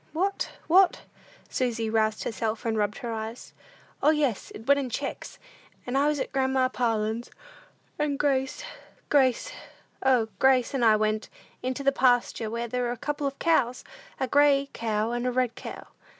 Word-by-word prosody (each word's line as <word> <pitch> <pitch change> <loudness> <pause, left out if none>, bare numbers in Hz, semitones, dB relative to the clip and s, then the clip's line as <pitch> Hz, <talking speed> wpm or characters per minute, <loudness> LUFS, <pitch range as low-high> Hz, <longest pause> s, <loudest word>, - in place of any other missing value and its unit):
"What? 390 +5 -1 0.2
What?" 370 +2 +4 0.5
Susy 230 -3 -1
roused 220 -1 +1
herself 225 0 -3
and 225 -1 0
rubbed 210 -1 0
her 240 -4 -5
eyes. 220 +2 -6 0.5
"O, - - +5
yes, 295 -8 +1
it 225 - -10
went 280 +2 +4
in 265 -2 -3
checks; - - -5 0.5
and 245 - -3
I 280 +2 +3
was 300 -1 +1
at - - -3
grandma 265 -1 +1
Parlin's, 225 -2 -1 0.7
and 295 -2 0
Grace 270 -2 0 0.5
Grace 260 -4 +2 0.5
O, 250 -4 +3
Grace 265 -1 +4
and 265 -3 0
I 220 -2 +6
went 215 0 0 0.3
into 260 +2 -3
the 275 - +4
pasture 245 -4 +2
where 235 +1 -3
there 250 +2 -2
were 240 -1 -1
a 245 - -4
couple 295 +3 -2
of 275 - -5
cows, 255 -7 +1 0.4
a 265 - 0
gray 280 0 +3
cow 220 0 -1
and 240 +1 -1
a - - +1
red 250 -1 0
cow." - - -8
250 Hz, 170 wpm, -27 LUFS, 225-275 Hz, 0.7 s, I